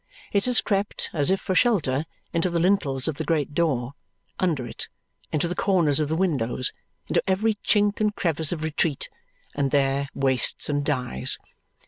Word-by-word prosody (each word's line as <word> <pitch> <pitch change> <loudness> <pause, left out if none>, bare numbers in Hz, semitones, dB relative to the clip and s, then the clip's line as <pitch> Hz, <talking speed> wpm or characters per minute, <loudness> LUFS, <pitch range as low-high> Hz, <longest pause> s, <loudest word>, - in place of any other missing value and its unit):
It 200 -1 +2
has 250 -2 +3
crept, 200 -1 -1
as 145 -3 +2
if 190 0 +3
for 185 - -2
shelter, 165 - +2 0.3
into 170 +2 +1
the 170 - -1
lintels 165 -7 +2
of 155 -3 -2
the 160 - -2
great 150 -2 0
door 140 -6 0 0.5
under 160 -9 0
it, 120 - -6 0.4
into 155 +2 +1
the 175 - -2
corners 175 -7 +2
of 155 - +1
the 160 - 0
windows, 130 -9 -1 0.3
into - - +2
every 215 +4 +2
chink 205 0 +2
and 210 -1 +1
crevice 160 -3 0
of 160 -3 -3
retreat, 155 -2 -1 0.4
and 140 -1 0
there 140 0 +1
wastes 135 0 +2
and 145 -1 0
dies. 125 - -1
155 Hz, 170 wpm, -25 LUFS, 140-185 Hz, 0.5 s, has